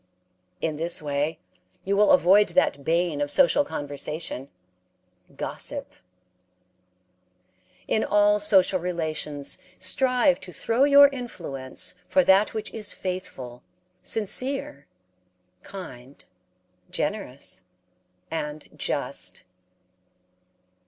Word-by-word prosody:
In 155 Hz, -2 st, -2 dB
this 170 Hz, +2 st, 0 dB
way 150 Hz, +1 st, -2 dB, 0.5 s
you 200 Hz, +1 st, 0 dB
will 210 Hz, +1 st, +4 dB
avoid 190 Hz, +4 st, +6 dB
that 140 Hz, -, +1 dB
bane 165 Hz, -1 st, 0 dB
of 145 Hz, -, -1 dB
social 275 Hz, -, +4 dB
conversation 145 Hz, -, -4 dB, 0.9 s
gossip. -, -, -4 dB, 2.0 s
In 220 Hz, -, +1 dB
all 205 Hz, 0 st, +3 dB
social 195 Hz, -2 st, +4 dB
relations 155 Hz, -5 st, -3 dB, 0.2 s
strive 255 Hz, +7 st, +2 dB
to 190 Hz, -1 st, -10 dB
throw 230 Hz, +9 st, +1 dB
your 285 Hz, 0 st, +8 dB
influence 180 Hz, -, -5 dB
for 280 Hz, -, +3 dB
that 195 Hz, +1 st, +4 dB
which 215 Hz, -1 st, -4 dB
is 210 Hz, -3 st, -3 dB
faithful, 135 Hz, -10 st, -6 dB, 0.4 s
sincere, 225 Hz, -, +1 dB, 0.7 s
kind, 140 Hz, -9 st, -11 dB, 0.6 s
generous, 140 Hz, -, -4 dB, 0.7 s
and 150 Hz, -2 st, -5 dB
just. -, -, -3 dB
180 Hz, 90 wpm, -25 LUFS, 150-210 Hz, 2.0 s, your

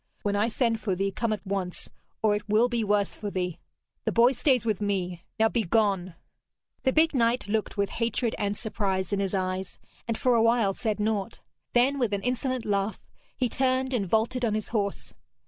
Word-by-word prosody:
When 205 Hz, -1 st, 0 dB
I 205 Hz, +2 st, +2 dB
send 230 Hz, -1 st, 0 dB
for 195 Hz, -4 st, -1 dB
thee, 195 Hz, +2 st, 0 dB
come 220 Hz, +3 st, -1 dB
at 210 Hz, -1 st, -3 dB
once, 190 Hz, -2 st, -3 dB, 0.3 s
or 215 Hz, -1 st, +4 dB
it 210 Hz, +1 st, -5 dB
will 220 Hz, +4 st, +4 dB
be 240 Hz, -2 st, -1 dB
worse 205 Hz, -1 st, +1 dB
for 205 Hz, -, -4 dB
thee. 180 Hz, -3 st, -3 dB, 0.4 s
The -, -, 0 dB
boy 235 Hz, +2 st, +5 dB
stays 255 Hz, -2 st, +2 dB
with 215 Hz, -3 st, 0 dB
me. 185 Hz, -4 st, -1 dB, 0.2 s
Now 220 Hz, -, +5 dB
begone!' 200 Hz, -5 st, +1 dB, 0.7 s
The 260 Hz, -, +2 dB
big 315 Hz, +3 st, +3 dB
knight 235 Hz, -2 st, +2 dB
looked 215 Hz, 0 st, -1 dB
with 200 Hz, 0 st, 0 dB
hatred 230 Hz, 0 st, 0 dB
and 205 Hz, 0 st, -1 dB
surprise 195 Hz, -4 st, -2 dB
in 200 Hz, -, +1 dB
his 195 Hz, 0 st, -1 dB
eyes, 185 Hz, 0 st, -2 dB, 0.3 s
and 230 Hz, -1 st, -1 dB
for 250 Hz, -, +2 dB
a 230 Hz, -, +4 dB
while 230 Hz, -3 st, +3 dB
said 215 Hz, 0 st, -2 dB
naught. 215 Hz, 0 st, -1 dB, 0.3 s
Then, 265 Hz, +3 st, +3 dB
with 235 Hz, -5 st, +1 dB
an 200 Hz, -, -1 dB
insolent 250 Hz, 0 st, -1 dB
laugh, 200 Hz, 0 st, 0 dB, 0.4 s
he 255 Hz, -, +1 dB
turned 260 Hz, +2 st, 0 dB
and 200 Hz, -7 st, 0 dB
vaulted 235 Hz, +4 st, +1 dB
on 220 Hz, -3 st, +1 dB
his 215 Hz, -, -3 dB
horse. 205 Hz, -3 st, -2 dB
215 Hz, 200 wpm, -27 LUFS, 200-240 Hz, 0.7 s, boy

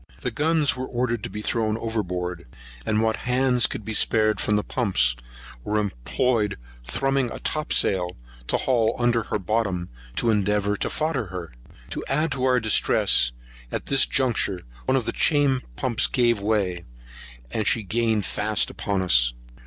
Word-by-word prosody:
The -, -, -1 dB
guns 155 Hz, -1 st, +2 dB
were 130 Hz, 0 st, -4 dB
ordered 120 Hz, -2 st, -1 dB
to -, -, -5 dB
be 105 Hz, -, -6 dB
thrown 110 Hz, -1 st, 0 dB
overboard; 90 Hz, -, -3 dB, 0.4 s
and 110 Hz, +1 st, +2 dB
what 110 Hz, 0 st, +1 dB
hands 125 Hz, -1 st, +2 dB
could 120 Hz, -6 st, -6 dB
be 110 Hz, -, -3 dB
spared 110 Hz, -1 st, +3 dB
from 105 Hz, -, +1 dB
the 105 Hz, -, +1 dB
pumps, 95 Hz, -, +2 dB, 0.5 s
were 105 Hz, -, -1 dB
employed 105 Hz, -, 0 dB, 0.3 s
thrumbing 135 Hz, -, 0 dB
a -, -, -6 dB
topsail 95 Hz, -, +1 dB, 0.3 s
to -, -, +2 dB
haul 115 Hz, -3 st, +1 dB
under 120 Hz, -1 st, +2 dB
her -, -, -1 dB
bottom, 95 Hz, -3 st, -1 dB, 0.3 s
to 115 Hz, -, +2 dB
endeavour 105 Hz, 0 st, +1 dB
to -, -, -2 dB
fodder 150 Hz, -8 st, -1 dB
her. 90 Hz, -3 st, -7 dB, 0.4 s
To -, -, -4 dB
add 150 Hz, +3 st, 0 dB
to 130 Hz, -2 st, -1 dB
our 125 Hz, -1 st, +3 dB
distress, 105 Hz, -, +3 dB, 0.4 s
at -, -, -4 dB
this 135 Hz, -1 st, +3 dB
juncture 115 Hz, -8 st, 0 dB, 0.2 s
one 130 Hz, -, +2 dB
of 125 Hz, -, -2 dB
the -, -, -1 dB
chain 145 Hz, -4 st, +2 dB
pumps 120 Hz, -, +2 dB
gave 120 Hz, -4 st, +2 dB
way; 100 Hz, -5 st, 0 dB, 0.7 s
and 110 Hz, -, -1 dB
she 115 Hz, -, +2 dB
gained 110 Hz, 0 st, 0 dB
fast 105 Hz, 0 st, 0 dB
upon 100 Hz, -2 st, -2 dB
us. -, -, +3 dB
110 Hz, 160 wpm, -24 LUFS, 100-125 Hz, 0.7 s, spared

